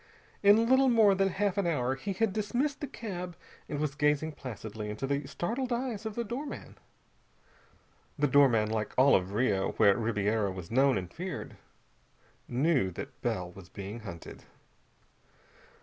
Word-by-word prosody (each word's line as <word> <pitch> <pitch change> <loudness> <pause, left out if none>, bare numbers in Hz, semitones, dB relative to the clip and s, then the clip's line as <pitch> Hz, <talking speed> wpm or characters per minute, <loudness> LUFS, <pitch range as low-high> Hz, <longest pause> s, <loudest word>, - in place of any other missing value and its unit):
In 210 +3 +6
little 260 +1 +5
more 220 -4 +5
than 195 0 +2
half 200 +1 0
an 190 - +1
hour 130 -6 +1
he 195 +9 -4
had 205 +1 0
dismissed 250 +9 -1
the 290 - -3
cab 180 -9 -6 0.3
and 150 - -3
was 150 -2 -1
gazing 150 +1 +1
placidly 110 -6 -7
into 105 +5 -4
the 140 0 -2
startled 245 +8 -3
eyes 235 -3 -2
of 215 - -6
the 235 - -1
doorman. 255 +6 -6 1.4
The 145 - +2
doorman, 125 -6 +4
like 110 -1 -2
all 135 +2 +6
of 95 +1 0
Rio 105 -4 +1
where 100 -1 +5
Ribiera 105 -2 0
was 90 -1 -8
known 135 +1 +4
and 90 -2 -5
feared, 180 -3 -6 0.9
knew 130 - +2
that - - -8
Bell 90 -1 -2
was 90 0 -13
being 100 +3 -7
hunted. 85 -7 -9
145 Hz, 155 wpm, -30 LUFS, -, 1.4 s, In